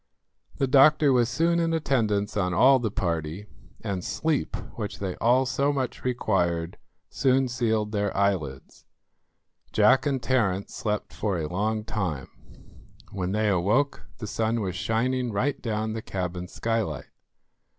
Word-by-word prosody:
The 135 - +2
doctor 140 +2 +5
was 120 -2 +3
soon 170 +4 +2
in 165 -1 +1
attendance 110 -9 0
on 90 -3 0
all 130 +6 +6
the 115 -3 -1
party, 85 0 -3 0.4
and 100 -4 -3
sleep, 160 +6 -1 0.2
which 105 -3 -5
they 95 -2 -4
all 125 +3 +3
so 140 +2 +1
much 135 -3 -3
required, 90 -9 0 0.3
soon 135 0 +2
sealed 110 -3 0
their 105 -1 0
eyelids. 85 -10 -1 0.9
Jack 110 +7 +4
and 135 -2 0
Terence 105 -7 0
slept 105 -6 -3
for 95 +2 -1
a 80 -2 -2
long 105 +5 -1
time. 90 - -3 0.8
When 95 -2 -3
they 105 +1 +1
awoke 105 +10 +1
the 110 - -6
sun 110 +2 -1
was 95 -3 -3
shining 120 +6 0
right 125 +8 -1
down 110 -2 -2
the 110 - -4
cabin 90 -3 -4
skylight. 110 -10 -3
110 Hz, 140 wpm, -26 LUFS, 95-130 Hz, 0.9 s, all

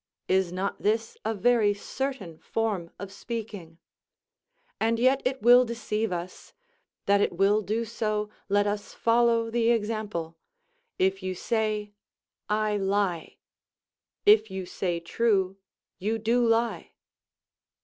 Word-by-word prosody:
Is 190 -2 +2
not 190 +2 -3
this 220 +2 0
a 220 - 0
very 210 -1 +3
certain 205 - -5
form 210 -7 -2
of 200 -1 -8
speaking? 205 -6 -7 1.0
And 225 +1 +1
yet 260 +3 +3
it 260 -2 -1
will 245 +2 +8
deceive 225 -2 -2
us; 175 +1 -6 0.5
that 200 0 +4
it - - +1
will 200 +4 +3
do 220 +3 -2
so, 215 -2 -2 0.2
let 205 +1 +3
us 205 0 -3
follow 230 0 +2
the 230 0 +2
example: 210 -7 -2 0.6
If 190 +1 +1
you 185 0 -3
say, 215 0 -1 0.6
"I 210 0 +1
lie," 195 -4 -1 0.9
if 415 - +6
you 190 -1 -5
say 175 -1 -2
true, 195 +1 0 0.4
you 215 +4 -1
do 230 +3 +1
lie. 230 +1 0
210 Hz, 125 wpm, -27 LUFS, 195-230 Hz, 1.0 s, will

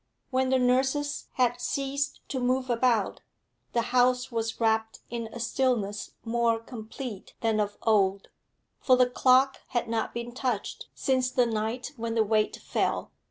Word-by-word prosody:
When 260 0 +2
the 260 - +4
nurses 265 +3 +1
had 245 -1 +1
ceased 280 +2 -2
to 265 - -2
move 255 +1 +1
about, 230 -3 +1 0.5
the 235 - +2
house 250 +1 +3
was 225 -1 -2
wrapped 220 -1 +1
in 230 -1 -3
a 240 - -9
stillness 225 -4 -1
more 230 0 +2
complete 225 -1 -8
than 225 -2 +1
of 205 -1 -1
old, 200 -3 +2 0.5
for 255 - +5
the 250 0 +5
clock 260 +2 +4
had 240 -1 -1
not 225 -1 -1
been 235 0 -5
touched 245 -4 -3
since 260 -1 +1
the 250 -1 +3
night 230 +4 -2
when 230 0 -3
the 225 - +4
weight 215 0 +1
fell. - - -1
240 Hz, 155 wpm, -28 LUFS, 225-255 Hz, 0.5 s, for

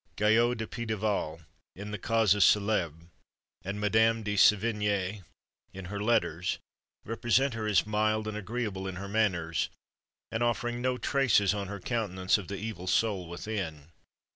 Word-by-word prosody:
Guyot 115 +3 +3
de 110 - -3
Pitaval, 105 -8 -2 0.3
in 100 +2 -7
the 105 - -4
Causes 105 -2 +3
Célèbres, 90 -7 +2 0.5
and 100 +2 -4
Madame 110 +2 +3
de 105 0 -2
Sevigné, 105 -2 +2 0.5
in 95 -1 -8
her 100 +2 -5
letters, 90 -6 +1 0.5
represent 120 +4 +1
her 110 -1 -3
as 105 -2 +3
mild 110 0 0
and 110 - -4
agreeable 105 -3 -3
in 95 - -5
her 100 +2 -6
manners, 95 -6 0 0.6
and 110 - -2
offering 120 +1 0
no 125 0 0
traces 120 -9 +3
on 100 -1 -3
her 100 +1 -6
countenance 95 -4 0
of 95 - -8
the 100 - -5
evil 100 -3 -6
soul 95 -3 +1
within. 85 -5 -5
105 Hz, 145 wpm, -29 LUFS, 95-110 Hz, 0.6 s, Guyot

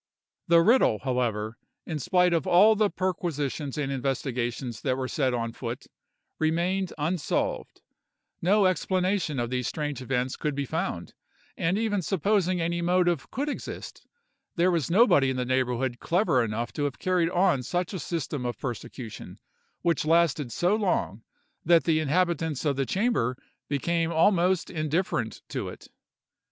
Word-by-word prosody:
"The 170 0 +6
riddle, 225 - +4
however, 115 -4 -1 0.3
in 160 -3 -4
spite 180 +2 +3
of 165 -4 0
all 205 +5 +6
the 210 -1 +2
perquisitions 155 -7 -2
and 140 -2 -1
investigations 125 -3 -2
that 130 -2 0
were 130 -1 -2
set 130 -1 0
on 115 -1 -2
foot 120 0 -6 0.5
remained 175 +4 0
unsolved—no 175 +4 -2
explanation 185 -3 0
of 120 0 -2
these 125 -2 -1
strange 145 -4 -3
events 130 0 -1
could 150 -2 -2
be 140 0 -2
found; 130 - -3 0.4
and 170 +4 0
even 215 -3 0
supposing 185 0 +1
any 170 +1 -1
motive 175 -5 +1
could 280 +3 -3
exist, 295 - -6 0.5
there 180 +1 +3
was 165 -6 0
nobody 170 - +5
in 130 - -2
the 125 - -1
neighborhood 125 -1 0
clever 170 - +2
enough 115 +2 -3
to 145 - -1
have 140 - -3
carried 180 -3 +1
on 175 -7 +2
such 175 - -2
a 190 - -3
system 150 -5 -3
of 120 -1 -3
persecution, 120 -2 -7 0.5
which 170 -3 +1
lasted 155 -5 +2
so 175 - +2
long, 180 - -1 0.4
that 170 0 +5
the 160 -2 +2
inhabitants 160 -1 0
of 145 -2 +2
the 135 -1 -1
chamber 195 - 0 0.3
became 165 +4 0
almost 175 +1 +2
indifferent 155 -6 -2
to - - -4
it. - - -12
160 Hz, 145 wpm, -27 LUFS, 130-180 Hz, 0.5 s, The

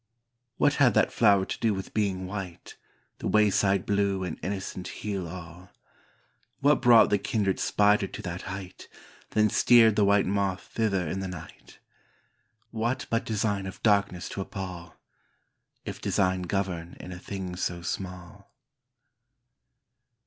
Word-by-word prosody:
What 145 - +3
had 120 -6 +5
that - - +3
flower 100 -4 +4
to - - -5
do 110 -3 +1
with 95 - -7
being 95 -3 -1
white, 95 -3 -7 0.4
The - - -3
wayside 100 -2 +3
blue 100 -2 0
and 90 -3 -5
innocent 95 0 -4
heal 100 -4 -4
all? 90 +1 -10 0.9
What 145 0 +3
brought 120 -3 +6
the 105 - +3
kindred 100 -2 -1
spider 105 -1 +3
to - - -8
that 90 0 -5
height, 95 -1 -8 0.4
Then 110 0 +3
steered 115 0 +5
the 105 - +3
white 100 0 +4
moth 100 -1 -1
thither 100 -6 0
in 95 - -3
the 95 - -3
night? 90 -4 -11 0.9
What 120 +3 -2
but 115 - 0
design 105 -3 -1
of 95 - -9
darkness 100 -4 +2
to 100 - -4
appal? 90 -4 -7 0.4
— - - -49
If - - -6
design 95 0 +1
govern 90 -4 -3
in 90 - -9
a 90 - -7
thing 95 -2 -6
so 85 -1 -3
small. 90 +2 -6
95 Hz, 145 wpm, -27 LUFS, 90-105 Hz, 0.9 s, brought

